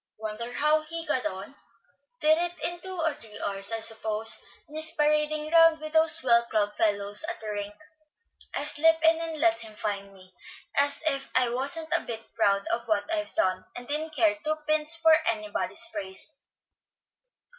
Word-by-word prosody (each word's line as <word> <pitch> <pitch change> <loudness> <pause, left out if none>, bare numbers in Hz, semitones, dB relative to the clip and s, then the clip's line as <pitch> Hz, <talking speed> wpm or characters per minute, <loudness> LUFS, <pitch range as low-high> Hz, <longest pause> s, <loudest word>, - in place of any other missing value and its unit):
Wonder 220 +2 -6
how 300 +4 +2
he 330 +2 -4
got 255 - 0
on. 190 +7 -8 0.7
Did 310 +1 +5
it 350 0 -1
in 350 0 -2
two 375 0 -6
or 320 -2 +1
three 220 -6 -11
hours, 195 +1 -1
I 225 0 -2
suppose, 220 0 +2 0.2
and 300 - -12
is 315 +1 +4
parading 300 0 0
round 330 -1 +5
with 310 0 -8
those 320 0 +5
swell 235 -2 +3
club 210 -2 -1
fellows 205 +1 +2
at 350 - -6
the 215 -1 -6
rink. 205 0 -5 0.8
I'll 285 - 0
slip 325 +2 +3
in 325 0 +4
and 325 -2 -5
let 335 +1 +2
him 220 -2 -9
find 200 -2 -4
me, 185 -1 -17 0.4
as 285 +2 +1
if 275 -3 -1
I 255 -2 +3
wasn't 305 +6 -1
a - - 0
bit 225 -1 -9
proud 200 0 +1
of 235 0 -2
what 215 +9 -1
I've 315 -1 -3
done, 185 - 0
and 245 0 -9
didn't 310 +2 -4
care 215 -5 +2
two 310 0 0
pins 310 +1 +4
for 325 -1 +4 0.2
anybody's 215 -2 0
praise." 200 +7 -7
275 Hz, 180 wpm, -27 LUFS, 215-315 Hz, 0.8 s, Did